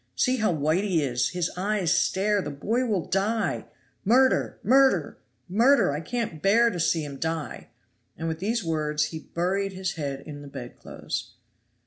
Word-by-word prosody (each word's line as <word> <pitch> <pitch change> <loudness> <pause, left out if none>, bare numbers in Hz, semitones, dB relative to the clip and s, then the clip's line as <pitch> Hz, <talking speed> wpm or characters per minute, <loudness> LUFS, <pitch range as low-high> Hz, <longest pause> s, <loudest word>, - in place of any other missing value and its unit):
See 255 0 +2
how 215 -4 +2
White 155 +4 +1
he 180 -7 +1
is! 125 -2 0
His 180 -1 -2
eyes 190 -2 +1
stare! 205 +1 +2
The - - -5
boy 225 - -1
will 200 -7 0
die! 210 +4 0 0.4
Murder! 260 +5 +3
murder! 265 +4 +3 0.3
murder! 230 - +4
I 145 +2 -3
can't 205 -4 -4
bear 230 +4 +4
to 180 - -5
see 165 -1 +1
him 140 -1 -7
die." 160 -2 -4 0.5
And 165 - -4
with 160 0 -3
these 220 +4 -1
words 150 -2 0
he 160 - -4
buried 190 +5 -2
his 185 -1 -2
head 140 -5 -4
in 145 -2 -8
the 145 - -10
bedclothes. 130 -3 -7
180 Hz, 165 wpm, -26 LUFS, 155-215 Hz, 0.5 s, murder